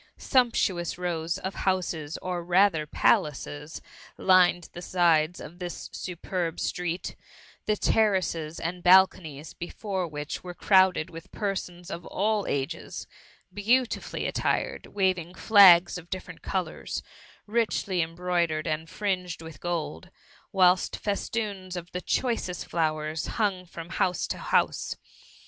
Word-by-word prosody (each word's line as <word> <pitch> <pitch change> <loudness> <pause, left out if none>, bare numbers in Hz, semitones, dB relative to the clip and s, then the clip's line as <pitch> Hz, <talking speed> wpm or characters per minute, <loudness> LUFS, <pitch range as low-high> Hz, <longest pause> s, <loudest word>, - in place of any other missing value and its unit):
Sumptuous 215 -10 +1
rows 170 -2 -2
of 190 +1 -4
houses, 170 -5 -1
or 180 -1 -2
rather 175 -3 +3
palaces, 150 +1 0 0.3
lined 180 -2 +4
the 175 - -7
sides 170 -2 +2
of 175 +3 -10
this 175 -1 -6
superb 175 -1 -3
street; 180 0 -3 0.5
the 215 - +3
ter 215 0 +3
races 165 -4 -2
and 175 +2 -4
balconies 175 -5 +4
before 190 +1 -4
which 150 -1 -5
were 180 -1 -7
crowd 190 -1 +5
ed 155 - -4
with 165 +3 -10
persons 180 -4 -4
of 170 - -5
all 210 +1 0
ages, 135 -1 -3 0.5
beautifully 235 +5 0
attired, - - -1
waving 185 -3 0
flags 185 -4 +7
of 170 0 -15
diflbrent 185 -1 -7
colours, - - -3 0.4
richly 210 -4 0
em 165 +1 -3
broidered 170 -3 0
and 160 0 -2
fringed 180 -5 -2
with 160 -3 -10
gold, 165 - -3 0.4
whilst 185 -1 +3
fes 205 -1 -2
toons 200 -5 -3
of 175 0 -7
the 180 - -4
choicest 230 -8 -1
flowers 155 -1 -1
hung 195 -5 0
from 165 0 -9
house 180 -1 0
to - - -4
house. - - 0
180 Hz, 130 wpm, -27 LUFS, 165-190 Hz, 0.5 s, flags